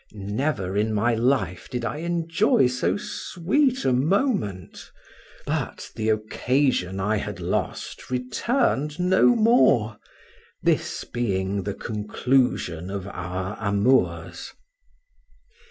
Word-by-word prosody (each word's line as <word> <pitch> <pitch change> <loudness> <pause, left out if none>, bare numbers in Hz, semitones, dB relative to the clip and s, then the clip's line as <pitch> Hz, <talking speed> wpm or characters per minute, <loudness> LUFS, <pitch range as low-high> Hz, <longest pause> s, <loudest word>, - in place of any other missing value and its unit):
Never 100 -1 -2
in 110 +1 +1
my 115 +3 +2
life 115 - 0
did 125 -1 -3
I 145 - -3
enjoy 165 -4 +2
so 125 +7 0
sweet 255 - 0
a 130 - +3
moment; 150 - -1 0.6
but - - -3
the 110 0 -1
occasion 110 -2 0
I 105 +3 +1
had 105 -2 -5
lost 90 0 -3
returned 145 - 0
no 185 +7 +4
more, 170 - +3 0.6
this - - 0
being 100 -4 -1
the 100 +1 -4
conclusion 105 -5 0
of 100 -1 -5
our 95 +2 -4
amours. 110 +5 +1
115 Hz, 105 wpm, -24 LUFS, 100-150 Hz, 0.6 s, no